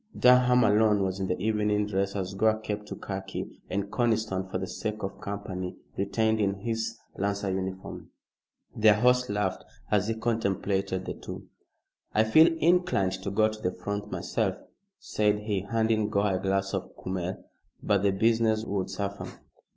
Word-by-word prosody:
Durham 125 0 +6
alone 105 -1 +4
was 95 0 -2
in 95 - -2
evening 105 0 +1
dress, 100 -1 -1
as 95 -1 -3
Gore 110 +2 +3
kept 105 -1 -5
to - - -6
khaki, 95 -1 -6
and 100 +1 -2
Conniston, 110 -5 0
for 95 - -2
the 95 - -3
sake 105 +2 -4
of 95 - -5
company, 95 -3 -5 0.2
retained 110 +3 +1 0.2
his 115 0 -2 0.2
lancer 100 0 -1
uniform. 95 0 -5 0.7
Their 110 -1 +6
host 125 +2 +3
laughed 100 -2 -1 0.3
as 105 -1 +2
he 115 - 0
contemplated 100 -4 -1
the - - -3
two. - - -9 0.7
"I 110 - +5
feel 155 +9 +6
inclined 170 - +3
to 100 - -3
go 110 +2 +3
to 110 0 -6
the 90 -2 -1
front 100 +3 -4
myself," - - -1 0.4
said 105 0 0
he, 105 -2 -1
handing 110 -2 +1
Gore 100 -1 +1
a 95 - 0
glass 95 0 0
of - - -4
kümmel, 95 0 -4 0.4
"but 100 -2 +2
the 100 - +3
business 110 +2 +2
would 100 -3 -2
suffer." 100 +1 -4
105 Hz, 160 wpm, -28 LUFS, 95-110 Hz, 0.7 s, Durham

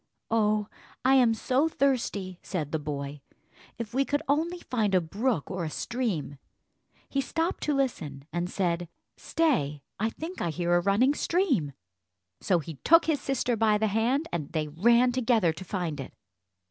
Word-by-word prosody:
"Oh, 215 -2 +2 0.4
I 265 - +6
am 245 -4 +5
so 260 +7 +1
thirsty!" 220 - 0
said 155 -6 -4
the 160 - 0
boy. 145 -1 -5 0.6
"If 230 -1 -6
we 270 +2 +3
could 290 +1 -1
only 330 +5 0
find 215 -6 0
a - - +6
brook 200 - -1
or 185 -2 -3
a 160 - -2
stream." 190 - -3 0.7
He 275 - 0
stopped 325 +6 -2
to 295 - +1
listen, 155 - -2
and 175 +1 -1
said, 175 -3 -1 0.3
"Stay, 150 - 0 0.2
I 220 +2 +1
think 325 +10 -7
I 170 - 0
hear 175 +2 0
a - - +5
running 210 +9 +3
stream." 290 - +1 0.7
So 185 - +2
he 160 -2 -6
took 330 - +5
his 315 -3 +1
sister 255 -2 0
by 215 -1 +3
the 220 - +1
hand, 240 +9 +1
and 155 -5 -3
they 155 -2 -1
ran 235 +10 +4
together 230 -9 +2
to 190 - -8
find 175 -6 -3
it. 135 - -6
215 Hz, 170 wpm, -28 LUFS, 170-265 Hz, 0.7 s, I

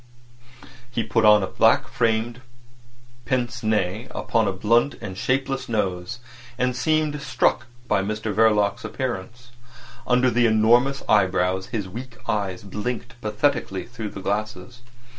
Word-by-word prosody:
He 120 -1 -2
put 110 0 +1
on 105 -1 +7
a - - -1
black - - +3
framed 115 +1 0 0.8
pince 120 -1 -1
nez 110 0 0
upon 115 -3 +1
a - - +1
blunt 115 +8 +2
and 95 -3 -6
shapeless 135 +5 -1
nose, 95 0 -2 0.4
and 125 0 0
seemed 155 +2 0
struck 130 -5 +1 0.2
by 105 -3 +2
Mr 110 +2 -3
Verloc's 105 -1 +3
appearance. 120 +1 -5 0.6
Under 125 0 +3
the 120 0 +3
enormous 120 +5 +3
eyebrows 95 -2 +2
his 105 -5 -3
weak 120 +5 -9
eyes 100 -3 -2
blinked 120 +4 -5
pathetically 110 -2 -1
through 115 -3 -6
the 95 - -8
glasses. 105 +3 -4
110 Hz, 130 wpm, -23 LUFS, 105-125 Hz, 0.8 s, on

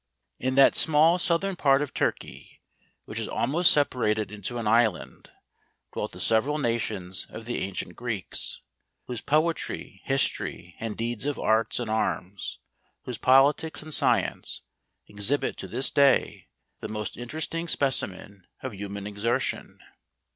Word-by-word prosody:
In 130 +1 -1
that 135 0 +6
small 160 +3 +5
southern 180 +3 +1
part 140 -3 +3
of 145 - -7
Turkey, - - -3 0.5
which - - -4
is - - -2
almost 175 +6 +3
separated 110 - +1
into 105 +3 -5
an 115 - -3
island, 110 -3 +1 0.6
dwelt - - -3
the - - -9
se¬ 110 -1 +4
veral 150 +2 -2
nations 110 -7 -2
of 115 - -9
the 120 - -2
ancient 95 -2 -4
Greeks; 115 -6 -3 0.4
whose 120 -2 -4
po¬ 155 +3 +2
etry, - - -7
history, 90 -9 0
and 110 -2 -4
deeds 120 +3 -2
of 145 - -1
arts 110 +3 +1
and 120 - -3
arms, 100 -3 -2 0.5
whose 125 -3 -4
politics, 140 +5 +3
and 155 0 -5
science, - - +1 0.4
exhibit 105 +8 0
to - - -7
this 130 +3 +1
day 140 -2 +3 0.3
the - - -5
most 105 -2 -5
interesting 155 +7 -4
specimen 100 - -1 0.2
of 130 -3 -4
human 100 0 -6
exertion. 105 +3 -2
120 Hz, 140 wpm, -26 LUFS, 105-145 Hz, 0.6 s, that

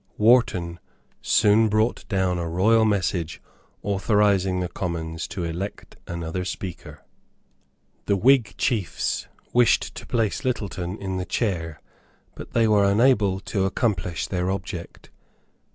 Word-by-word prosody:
Wharton 105 -7 +3 0.4
soon 110 +1 +4
brought 110 +3 0
down 95 -4 0
a 85 -1 -3
royal 110 +6 +3
message 95 -5 -1 0.4
authorising 100 -2 +2
the 90 - -1
Commons 80 -3 -4
to 95 -4 -5
elect 85 +4 -5
another 85 +1 -4
Speaker. 90 -1 -7 1.0
The 100 - +2
Whig 115 -2 +3
chiefs 110 -9 -1 0.3
wished 120 -1 +3
to - - -9
place 115 -4 0
Littleton 100 -6 -3
in 95 -1 -3
the 90 - -3
chair; 80 - -2 0.5
but - - -11
they 115 -1 +3
were 105 -2 +4
unable 105 -4 +3
to 95 -1 -1
accomplish 95 -5 -1
their 90 -1 -2
object. 95 -3 -6
95 Hz, 120 wpm, -24 LUFS, 90-110 Hz, 1.0 s, soon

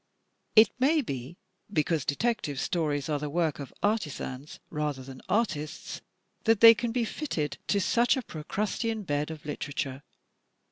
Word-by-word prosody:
It 220 -2 +8
may 300 +4 +4
be 140 - -6 0.3
because 155 -4 +1
Detective 150 - 0
Stories 150 -4 0
are 150 -2 0
the 150 0 -3
work 160 -2 0
of 140 - -7
artisans 150 - -2
rather 150 -3 -2
than 130 0 -10
artists 170 -9 -1 0.4
that 225 -2 +4
they 230 0 +11
can 235 +1 -2
be 235 0 0
fitted 165 - -3
to 200 - +2
such 240 +6 +3
a 260 - -2
Pro 155 -7 -8
crustean 215 +4 -2
bed 145 -3 -1
of 160 -2 -8
literature. 145 -2 -4
160 Hz, 150 wpm, -29 LUFS, 145-225 Hz, 0.4 s, they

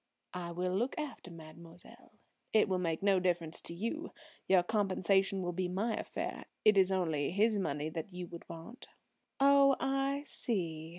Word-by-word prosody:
"I 180 -1 -4
will 180 +1 -2
look 240 +7 -1
after 300 -10 -5
mademoiselle. 165 +1 -13 0.4
It 220 -1 +5
will 185 -2 0
make 165 0 -1
no 195 -2 +4
difference 175 -3 -1
to - - -5
you. 235 - -4 0.3
Your 185 -2 +5
compensation 195 -1 +1
will 175 - -1
be 185 +1 -1
my 205 +6 -1
affair. - - -4 0.2
It 215 -1 +7
is 190 -1 +4
only 160 -6 0
his 210 +3 +2
money 150 -4 -2
that 160 +4 -6
you 180 0 -6
would 170 -1 -10
want." 165 +10 -10 0.5
"Oh, 275 0 +6
I 275 +1 0
see!" 165 - -3
185 Hz, 165 wpm, -33 LUFS, 170-220 Hz, 0.5 s, It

